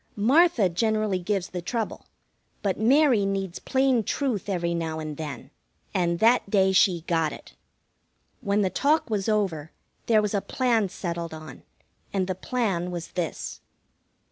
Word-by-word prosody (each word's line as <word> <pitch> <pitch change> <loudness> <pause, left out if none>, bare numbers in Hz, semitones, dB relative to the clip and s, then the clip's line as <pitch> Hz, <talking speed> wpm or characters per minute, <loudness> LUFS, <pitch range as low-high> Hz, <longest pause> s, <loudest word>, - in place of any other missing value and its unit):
Martha 255 - +4
generally 215 +1 0
gives 195 0 -2
the 180 - -5
trouble, 225 +5 -4 0.6
but 195 -3 0
Mary 255 -1 +4
needs 195 -2 -2
plain 265 -3 +2
truth 235 -5 -2
every 170 -3 -1
now 165 -2 -2
and 155 -1 -5
then, 150 -3 -7 0.4
and 170 -2 +1
that 230 +1 +3
day 190 -2 +3
she 185 -3 +3
got 165 -2 0
it. - - -11 0.9
When 200 +1 +1
the 185 - 0
talk 290 -3 +1
was 205 0 0
over, 185 -8 -1 0.4
there 215 -2 +4
was 210 - -1
a 200 - +1
plan 230 -5 +1
settled 170 -3 -5
on, 155 -4 -10 0.5
and 190 -2 0
the 185 - -2
plan 190 -4 -2
was 175 -2 -5
this. 175 -3 -4
195 Hz, 150 wpm, -26 LUFS, 170-220 Hz, 0.9 s, Martha